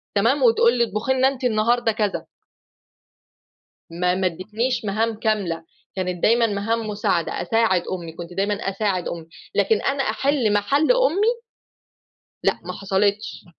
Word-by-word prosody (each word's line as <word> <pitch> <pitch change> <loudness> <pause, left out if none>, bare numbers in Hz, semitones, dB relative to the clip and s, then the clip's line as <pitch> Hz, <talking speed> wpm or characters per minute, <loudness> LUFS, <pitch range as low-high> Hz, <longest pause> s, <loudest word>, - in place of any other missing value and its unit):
تمام؟ 235 +7 +2
وتقول 235 0 +5
لي 235 - +4
اطبُخي 230 +4 -1
لنا 260 0 +3
أنتِ 270 -1 -3
النهارده 235 0 +2
كذا. 210 -2 -2 1.6
ما 180 +2 0
ما 185 0 +1
إدّيتنيش 215 +8 -2
مهام 220 +2 -1
كاملة، 195 -8 -1 0.3
كانت 180 -2 -3
دايمًا 230 +1 +4
مهام 220 +2 -2
مساعدة، 205 -5 -1
أساعد 225 -6 +2
أمي، 175 -3 -5
كنت 170 +2 -9
دايمًا 200 +3 0 0.2
أساعد 195 -2 -1
أمي، 165 -2 -6 0.3
لكن 445 - +2
أنا 275 0 0
أحِل 235 -1 +1
مَحَل 275 - +2
أمي 470 -1 +2 1.0
لأ، - - +1
ما - - -6
حصلتش. 200 +1 -1
215 Hz, 135 wpm, -22 LUFS, 190-240 Hz, 1.6 s, وتقول